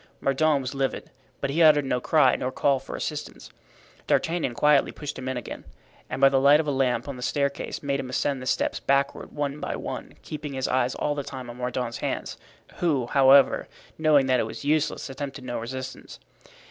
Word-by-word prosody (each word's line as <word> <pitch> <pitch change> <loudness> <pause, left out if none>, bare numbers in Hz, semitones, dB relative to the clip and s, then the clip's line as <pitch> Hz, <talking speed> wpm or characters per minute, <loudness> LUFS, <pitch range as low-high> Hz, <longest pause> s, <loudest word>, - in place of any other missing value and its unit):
Mordaunt 140 +1 +2
was 130 +1 -5
livid, 135 -1 -2 0.3
but 140 - -1
he 165 +4 +1
uttered 150 -3 +6
no 125 -2 -1
cry 140 -4 +4
nor 130 - -2
called 135 0 +1
for 135 - -7
assistance. 150 -1 -6 0.6
D'Artagnan 165 -7 0
quietly 150 +2 +4
pushed 145 -3 -7
him 130 0 -4
in 130 - -2
again, 125 - -7 0.5
and - - -4
by 135 - +7
the 135 -1 +3
light 145 +2 +6
of 160 - 0
a 145 - 0
lamp 130 -3 0
on 140 -2 -5
the - - -9
staircase 140 +4 -2
made 140 -1 -1
him 130 - -5
ascend 135 +1 -1
the 130 - -6
steps - - 0
backward 140 0 0
one 145 0 -3
by - - -3
one, - - -6
keeping 150 -1 -6
his 130 -1 -2
eyes 130 -1 +1
all 150 - -1
the 145 - -3
time 130 -3 -7
on 120 - -12
Mordaunt's 125 -1 -3
hands, - - -4 0.4
who, 150 -8 +1
however, 135 +2 +5 0.3
knowing 150 -3 +4
that 130 -1 +2
it 110 - 0
was 115 - -8
useless, 155 +1 0
attempted 135 -1 -6
no 120 -1 -4
resistance. 130 +3 -7
135 Hz, 200 wpm, -25 LUFS, 130-145 Hz, 0.6 s, by